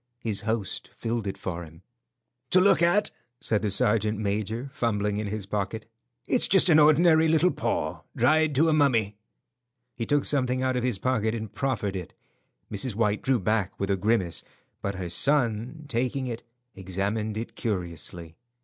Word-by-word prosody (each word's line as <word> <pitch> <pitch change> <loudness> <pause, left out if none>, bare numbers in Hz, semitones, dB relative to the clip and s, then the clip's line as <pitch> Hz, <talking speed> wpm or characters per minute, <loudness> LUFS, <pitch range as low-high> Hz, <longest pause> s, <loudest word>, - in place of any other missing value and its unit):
His 110 -4 -1
host 110 -2 -2
filled 115 -2 -3
it 95 - -4
for 85 -2 -5
him. 80 +2 -14 0.7
"To 185 - +5
look 190 -2 +4
at," 175 +5 +3 0.3
said 110 -2 0
the 105 - 0
sergeant 105 +2 +2
major, 110 +5 -3
fumbling 105 -4 -1
in 105 0 -2
his 105 -1 -4
pocket, 105 +2 -3 0.4
"it's 250 - +3
just 190 -1 +5
an 155 -2 +6
ordinary 160 +2 +5
little 160 +3 +3
paw, - - -2
dried 155 +4 +3
to 155 +5 +4
a 160 - +3
mummy." 115 -9 +2 0.8
He 115 -2 -5
took 145 -1 +2
something 130 -2 +1
out 130 0 +1
of 125 - 0
his 125 -4 0
pocket 110 0 0
and 110 -2 -6
proffered 115 -5 -2
it. 90 -3 -6 0.6
Mrs. 110 +2 -2
White 105 -2 +1
drew 130 -2 +1
back 105 -1 -1
with 100 0 -1
a - - +3
grimace, 95 -3 0 0.4
but 100 0 -3
her 95 -1 -4
son, 125 - +1
taking 130 +1 -1
it, 120 -2 -5 0.3
examined 100 +3 -3
it 115 - -6
curiously. 85 -5 -4
110 Hz, 165 wpm, -26 LUFS, 100-135 Hz, 0.8 s, an